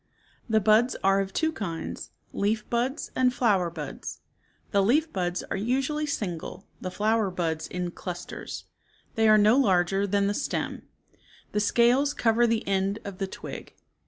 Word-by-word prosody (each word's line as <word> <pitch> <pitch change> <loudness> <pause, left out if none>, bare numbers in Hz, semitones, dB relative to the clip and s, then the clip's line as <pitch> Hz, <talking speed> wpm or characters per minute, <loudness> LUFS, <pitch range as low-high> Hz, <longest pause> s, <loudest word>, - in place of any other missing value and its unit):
The 220 0 +4
buds 220 +4 +4
are 195 0 +4
of 195 -1 -2
two 320 +9 +1
kinds, 175 - -5 0.2
leaf 210 +2 0
buds 250 +5 -1
and 255 -1 +3
flower 205 -8 +2
buds. 155 -4 -7 0.5
The 200 - +4
leaf 295 +11 +2
buds 180 -2 -1
are - - -4
usually 270 +8 0
single, 190 - -4 0.2
the 185 - -3
flower 210 +2 +1
buds 165 -3 -2
in 180 -1 -3
^ - - -26
clusters. 180 -2 -6 0.5
They 225 -1 +3
are 215 - +7
no 215 +3 +5
larger 195 -4 +3
than 200 0 +2
the 200 - +1
ofAfPLE. - - -2
stem. - - -2 0.7
The 210 - 0
scales 240 +7 +3
cover 235 +1 +3
the 225 -3 0
end 195 +1 +1
of 200 -2 -7
the 195 - -1
twig. - - -8
205 Hz, 165 wpm, -27 LUFS, 190-240 Hz, 0.7 s, are